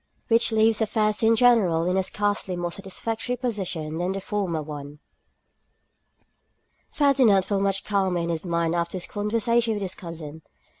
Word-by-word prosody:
Which 230 0 +4
Leaves 220 0 +3
Affairs 215 0 +1
in 225 0 +4
General 220 -9 +4
in 180 +1 0
a 190 - +3
Scarcely 205 -1 -1
More 175 0 -3
Satisfactory 225 +5 -3
Position 185 -10 -3
than 180 +2 -1
the 195 - -3
Former 190 -6 -2
One. 145 -1 -8 1.9
FERDINAND 255 -10 +3
felt 200 -2 -1
much 195 0 0
calmer 195 -3 0
in 170 0 -2
his 165 -1 -2
mind 170 -1 0
after 170 +1 -2
this 175 - -4
conversation 225 +2 0
with 205 - -3
his 185 -1 -4
cousin. 160 -3 -8
195 Hz, 155 wpm, -25 LUFS, 170-220 Hz, 1.9 s, Which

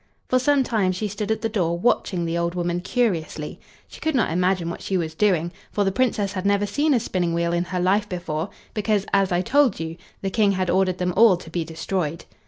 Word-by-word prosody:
For 255 - +3
some 280 +1 +3
time 215 -7 +1
she 210 +4 -2
stood 205 +1 -4
at 220 0 0
the - - +2
door, 175 -6 0
watching 180 -3 +1
the 165 0 -2
old 170 +1 -1
woman 175 0 -1
curiously; 175 -9 -1 0.3
she - - -13
could 315 -2 0
not 225 -10 +2
imagine 180 0 +1
what 170 - -5
she 190 - -1
was 160 -3 -2
doing, 175 -2 +1 0.2
for 205 - +1
the 195 - +1
Princess 205 -3 0
had 185 -2 -3
never 200 0 +2
seen 290 +8 +1
a - - +3
spinning 180 -6 -1
wheel 170 0 0
in 175 +1 0
her 180 +1 -3
life 200 +4 +2
before, 175 -1 -3 0.2
because, 210 -2 0
as 195 -1 +3
I 175 0 +2
told 255 +1 +3
you, 165 0 -5 0.3
the 195 - -1
King 205 -1 +3
had 185 -1 0
ordered 185 -1 +2
them 180 -1 -1
all 215 -3 +6
to 165 -2 -12
be 170 0 -1
destroyed. 165 0 -3
185 Hz, 230 wpm, -23 LUFS, 170-210 Hz, 0.3 s, all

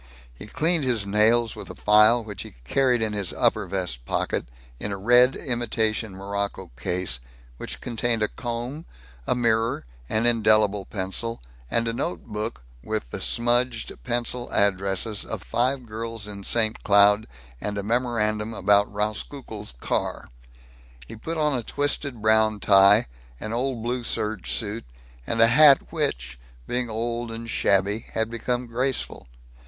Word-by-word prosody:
He - - -11
cleaned 160 +6 +1
his 120 -6 +1
nails 110 +3 +3
with - - -9
a - - -8
file 105 +3 +5
which 105 -4 -7
he - - -10
carried 125 - +2
in 110 -1 -2
his 100 -4 -1
upper - - +1
vest 90 -11 -3
pocket - - -1 0.3
in 105 - -4
a 100 - -3
red 125 +5 +5
imitation 110 -4 -1
morocco 100 -4 -4
case 90 -3 -1 0.4
which - - -6
contained 115 -2 -1
a - - +2
comb, 120 +8 -5 0.4
a - - +2
mirror, 115 - +1 0.2
an 110 +2 +1
indelible 110 -4 +3
pencil, 105 +4 -3 0.3
and 115 - +1
a 115 - -1
note 90 -7 -3
book 105 - -5 0.2
with - - -4
the - - -5
smudged 120 0 0
pencil 120 0 -2
addresses 100 +1 +1
of - - -6
five 125 - 0
girls 115 0 -5
in 100 -1 -8
St. 110 +1 +1
Cloud, 105 +1 +5 0.3
and 105 0 -3
a 100 - -2
memorandum 110 -1 0
about 100 +1 +3
Rauskukle's 105 - -4
car. - - -3 0.8
He 60 - -10
put 160 +9 -5
on 150 -2 +1
a 125 - -1
twisted 140 -2 -2
brown 110 -1 +3
tie, 100 +1 +6 0.3
an 110 - -5
old 125 -1 -2
blue 120 +1 -2
serge 110 -4 -2
suit, 110 0 -1 0.4
and 115 - -1
a 115 - +8
hat 140 +2 +6
which, 60 0 -2 0.3
being 125 -1 -2
old 115 +1 -3
and 115 +1 -7
shabby, 100 0 +1
had 110 0 0
become 120 +1 -2
graceful. 125 - -2
110 Hz, 150 wpm, -25 LUFS, 100-120 Hz, 0.8 s, a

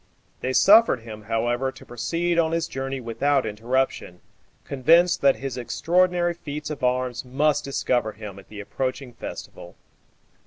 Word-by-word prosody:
They 130 - -2
suffered 210 - +6
him, 110 -2 -10
however, 120 +4 0
to - - -14
proceed 165 +9 -1
on 160 -1 +2
his 165 -1 0
journey 135 0 -4
without 130 +3 0
interruption, 110 -3 -2 0.4
convinced 165 +6 +3
that 140 -1 +5
his 135 -2 -5
extraordinary 175 +6 +1
feats 150 -2 -6
of 145 -3 -7
arms 125 -1 0
must 140 +4 +1
discover 125 -5 -1
him 105 -2 -9
at 95 - -17
the 105 -1 -8
approaching 130 +3 -4
festival. 115 - -9
130 Hz, 145 wpm, -24 LUFS, 120-155 Hz, 0.4 s, suffered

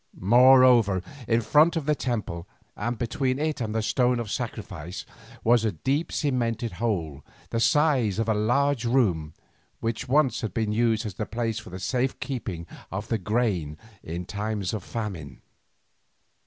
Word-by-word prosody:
Moreover 120 -3 +6 0.2
in 115 0 +3
front 155 +8 +4
of 160 -4 -2
the 150 - +3
temple, 110 - -3 0.3
and 120 0 -3
between 130 +2 -1
it 150 -2 -1
and 110 -1 -2
the 110 - 0
stone 125 +1 +2
of 115 -4 -4
sacrifice, 85 +5 -5 0.4
was 120 0 +4
a 110 -3 0
deep 135 - -1
cemented 120 -5 -1
hole 80 -11 -2 0.3
the 115 - 0
size 130 -6 +3
of 115 0 0
a 110 - +3
large 125 +5 +1
room, 100 - +1 0.4
which 115 +2 -3
once 135 -4 +3
had 110 -6 -4
been 110 -2 0
used 115 0 +1
as 100 -4 -6
a 110 - -1
place 115 -1 -2
for - - -11
the 90 +1 -7
safe 125 +7 -1
keeping 105 -11 -4 0.3
of 100 +3 -5
grain 100 -9 0 0.2
in 85 +2 -5
times 105 -1 -3
of 105 -4 -3
famine. 95 - -5
115 Hz, 155 wpm, -26 LUFS, 100-125 Hz, 0.4 s, Moreover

